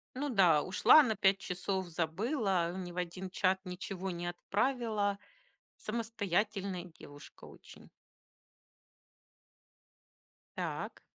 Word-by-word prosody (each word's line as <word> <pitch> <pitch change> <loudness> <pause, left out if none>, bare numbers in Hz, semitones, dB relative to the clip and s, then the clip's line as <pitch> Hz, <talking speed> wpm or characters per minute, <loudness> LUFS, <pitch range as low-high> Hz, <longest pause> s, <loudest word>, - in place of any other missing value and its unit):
Ну 285 +3 -2
да, 180 - +5
ушла 295 +10 +6
на 220 -4 0
5 195 -1 +3
часов, 190 0 -3
забыла, 180 - 0
ни 180 -2 -5
в 175 - -11
1 180 +1 -4
чат 190 0 +1
ничего 190 +1 -5
не 175 0 -4
отправила. 210 +2 -1 0.6
Самостоятельная 205 -4 -2
девушка 145 -4 -14
очень. - - -15 2.7
Так. - - -4
190 Hz, 95 wpm, -33 LUFS, 175-215 Hz, 2.7 s, ушла